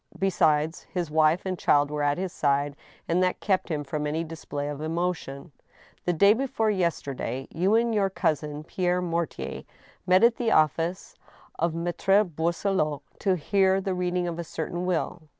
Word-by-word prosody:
Besides, 160 Hz, -4 st, +2 dB
his 175 Hz, -4 st, -3 dB
wife 155 Hz, +3 st, +3 dB
and 185 Hz, -1 st, -3 dB
child 145 Hz, 0 st, +3 dB
were 150 Hz, 0 st, -2 dB
at 145 Hz, 0 st, +1 dB
his 185 Hz, -1 st, -3 dB
side, 140 Hz, 0 st, +1 dB, 0.3 s
and 170 Hz, +2 st, +2 dB
that 185 Hz, 0 st, +1 dB
kept 190 Hz, -3 st, 0 dB
him 150 Hz, -3 st, -2 dB
from 150 Hz, +1 st, -3 dB
any 160 Hz, +3 st, -1 dB
display 150 Hz, -3 st, -5 dB
of 145 Hz, 0 st, -5 dB
emotion. 160 Hz, -3 st, -3 dB, 0.3 s
" -, -, -28 dB
The 175 Hz, -, +2 dB
day 200 Hz, +5 st, +6 dB
before 225 Hz, -3 st, 0 dB
yesterday 140 Hz, -, -2 dB
you 185 Hz, +6 st, +2 dB
and 230 Hz, 0 st, +2 dB
your 200 Hz, -2 st, +2 dB
cousin, 150 Hz, -4 st, -1 dB
Pierre 180 Hz, +2 st, 0 dB
Mortier, 170 Hz, -2 st, -3 dB, 0.5 s
met 185 Hz, +3 st, +5 dB
at 235 Hz, 0 st, +5 dB
the 235 Hz, -2 st, 0 dB
office 165 Hz, +4 st, +1 dB, 0.5 s
of 165 Hz, 0 st, 0 dB
Maltre 175 Hz, +4 st, +2 dB
Boisselot, 165 Hz, -2 st, -1 dB, 0.2 s
to 190 Hz, -2 st, +2 dB
hear 190 Hz, +3 st, +2 dB
the 195 Hz, 0 st, -2 dB
reading 180 Hz, 0 st, -1 dB
of 170 Hz, 0 st, -4 dB
a -, -, -2 dB
certain 175 Hz, +2 st, -4 dB
will?" 175 Hz, -1 st, -1 dB
170 Hz, 170 wpm, -26 LUFS, 150-185 Hz, 0.5 s, day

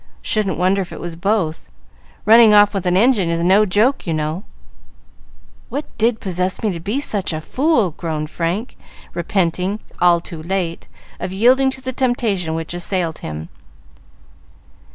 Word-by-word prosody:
"Shouldn't 210 Hz, -3 st, -1 dB
wonder 185 Hz, +3 st, +2 dB
if 185 Hz, -, -6 dB
it -, -, -8 dB
was 170 Hz, -1 st, -6 dB
both. 175 Hz, -, -1 dB, 0.6 s
Running 220 Hz, -1 st, +7 dB
off 205 Hz, 0 st, +6 dB
with 190 Hz, -2 st, -2 dB
an 180 Hz, +1 st, +3 dB
engine 210 Hz, -5 st, +3 dB
is 170 Hz, 0 st, 0 dB
no 195 Hz, +4 st, +4 dB
joke, 215 Hz, +6 st, +1 dB
you 165 Hz, -, 0 dB
know." 155 Hz, +4 st, -3 dB, 1.3 s
"What 290 Hz, +2 st, -3 dB
did 225 Hz, 0 st, +2 dB
possess 185 Hz, 0 st, -2 dB
me 215 Hz, -, +1 dB
to 170 Hz, -, -5 dB
be 205 Hz, +11 st, -2 dB
such 205 Hz, -10 st, -1 dB
a 155 Hz, -, -3 dB
fool?" 250 Hz, -, +1 dB
groaned 155 Hz, -1 st, -4 dB
Frank, 180 Hz, +8 st, -3 dB, 0.4 s
repenting, 180 Hz, +3 st, -1 dB, 0.2 s
all 175 Hz, -1 st, +5 dB
too 165 Hz, -1 st, -8 dB
late, 175 Hz, -1 st, -3 dB, 0.3 s
of -, -, -4 dB
yielding 250 Hz, +7 st, +4 dB
to 265 Hz, 0 st, -8 dB
the 260 Hz, 0 st, -4 dB
temptation 220 Hz, -10 st, 0 dB
which 165 Hz, +1 st, -4 dB
assailed 175 Hz, -2 st, -2 dB
him. 80 Hz, +1 st, -7 dB
190 Hz, 155 wpm, -19 LUFS, 170-220 Hz, 1.3 s, Running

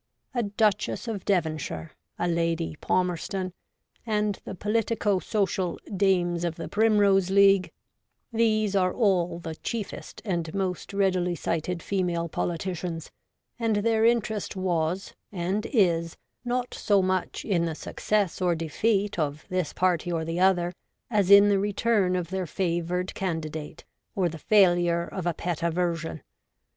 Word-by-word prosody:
A 245 Hz, -, +1 dB
Duchess 210 Hz, +1 st, 0 dB
of 215 Hz, -5 st, -4 dB
Devonshire, 155 Hz, -, -1 dB, 0.3 s
a 175 Hz, -, 0 dB
Lady 165 Hz, -1 st, 0 dB
Palmerston, 185 Hz, +1 st, -1 dB, 0.5 s
and 210 Hz, -3 st, 0 dB
the -, -, -6 dB
politico 210 Hz, 0 st, 0 dB
social 190 Hz, -4 st, -1 dB, 0.2 s
Dames 175 Hz, -3 st, +2 dB
of 170 Hz, -2 st, -1 dB
the -, -, -6 dB
Primrose 205 Hz, -3 st, +3 dB
League, 195 Hz, -1 st, +5 dB, 0.6 s
these 215 Hz, -3 st, +2 dB
are 185 Hz, -1 st, +3 dB
all 180 Hz, -6 st, +2 dB
the 165 Hz, -2 st, -6 dB
chiefest 215 Hz, +6 st, -6 dB
and 170 Hz, -5 st, -2 dB
most 185 Hz, -2 st, -2 dB
readily 185 Hz, -3 st, +1 dB
cited 170 Hz, +2 st, -2 dB
female 175 Hz, -4 st, -1 dB
politicians: 170 Hz, 0 st, -3 dB, 0.5 s
and 225 Hz, -2 st, +1 dB
their 220 Hz, +1 st, +2 dB
interest 220 Hz, -4 st, +1 dB
was, 180 Hz, -1 st, -1 dB, 0.2 s
and 190 Hz, +3 st, -2 dB
is, 170 Hz, -, +1 dB, 0.3 s
not 250 Hz, 0 st, -2 dB
so 200 Hz, -2 st, +2 dB
much 185 Hz, -1 st, -1 dB
in 175 Hz, -5 st, +1 dB
the 165 Hz, -2 st, -3 dB
success 205 Hz, +2 st, -1 dB
or 175 Hz, -2 st, +2 dB
defeat 195 Hz, +5 st, 0 dB
of 150 Hz, 0 st, -2 dB
this 185 Hz, -4 st, -1 dB
party 175 Hz, -2 st, +1 dB
or 165 Hz, -1 st, -1 dB
the 165 Hz, +2 st, -2 dB
other 180 Hz, -2 st, +3 dB, 0.4 s
as 205 Hz, -4 st, +2 dB
in 200 Hz, 0 st, +9 dB
the 200 Hz, -1 st, +3 dB
return 205 Hz, -1 st, +1 dB
of 180 Hz, -1 st, -3 dB
their 190 Hz, -2 st, -2 dB
favoured 180 Hz, +1 st, -1 dB
candidate 160 Hz, -4 st, -4 dB, 0.3 s
or 185 Hz, -3 st, +2 dB
the 165 Hz, 0 st, -8 dB
failure 175 Hz, -3 st, +4 dB
of 175 Hz, 0 st, -5 dB
a 175 Hz, -, +1 dB
pet 175 Hz, -3 st, -3 dB
aversion. 170 Hz, -2 st, -1 dB
185 Hz, 140 wpm, -27 LUFS, 170-205 Hz, 0.6 s, in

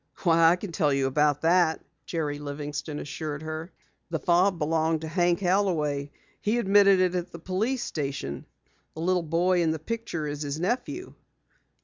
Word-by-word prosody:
"Why, 165 Hz, -2 st, +5 dB
I 170 Hz, -, +4 dB
can 180 Hz, 0 st, -7 dB
tell 155 Hz, -3 st, +1 dB
you 135 Hz, -1 st, +1 dB
about 145 Hz, +2 st, +2 dB
that," 170 Hz, -1 st, +3 dB, 0.3 s
Jerry 150 Hz, -4 st, -2 dB
Livingston 145 Hz, +1 st, -5 dB
assured 150 Hz, 0 st, -5 dB
her. 160 Hz, +2 st, -5 dB, 0.4 s
"The 165 Hz, -, -1 dB
fob 180 Hz, +3 st, +3 dB
belonged 160 Hz, 0 st, +1 dB
to 160 Hz, -, -5 dB
Hank 175 Hz, +2 st, +1 dB
Holloway. 165 Hz, -7 st, +1 dB, 0.3 s
He 215 Hz, +3 st, +1 dB
admitted 200 Hz, -3 st, +5 dB
it 185 Hz, -1 st, +2 dB
at 180 Hz, 0 st, -3 dB
the -, -, -8 dB
police 210 Hz, +9 st, -1 dB
station. 140 Hz, -, -4 dB, 0.5 s
The 160 Hz, -, -6 dB
little 180 Hz, +1 st, +2 dB
boy 175 Hz, +3 st, +2 dB
in 165 Hz, -, +2 dB
the 160 Hz, -, 0 dB
picture 195 Hz, -2 st, -4 dB
is 145 Hz, 0 st, -4 dB
his 145 Hz, +1 st, -3 dB
nephew." 255 Hz, -, -2 dB
165 Hz, 165 wpm, -27 LUFS, 150-185 Hz, 0.5 s, Why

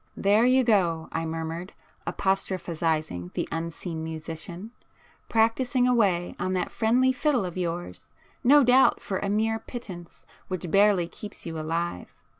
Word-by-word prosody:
"There 210 Hz, +4 st, +4 dB
you 260 Hz, +1 st, +4 dB
go!" 175 Hz, -8 st, +2 dB
I 165 Hz, 0 st, -2 dB
murmured, 165 Hz, +3 st, -5 dB, 0.3 s
apostrophizing 165 Hz, -, -1 dB
the -, -, -1 dB
unseen 165 Hz, 0 st, -4 dB
musician,—"practising 220 Hz, -, -2 dB
away 200 Hz, -8 st, +2 dB
on 185 Hz, -, -1 dB
that 180 Hz, -1 st, -1 dB
friendly 250 Hz, +3 st, +3 dB
fiddle 260 Hz, -5 st, +1 dB
of 175 Hz, -, -6 dB
yours,—no 185 Hz, +10 st, 0 dB
doubt 255 Hz, +2 st, +5 dB
for 190 Hz, -, -3 dB
a 200 Hz, -, -2 dB
mere 220 Hz, +2 st, +1 dB
pittance 190 Hz, -8 st, -9 dB, 0.2 s
which 180 Hz, -3 st, -4 dB
barely 200 Hz, -3 st, +4 dB
keeps 205 Hz, +4 st, -10 dB
you 165 Hz, -1 st, -4 dB
alive. 165 Hz, -, -3 dB
185 Hz, 125 wpm, -26 LUFS, 165-225 Hz, 0.3 s, doubt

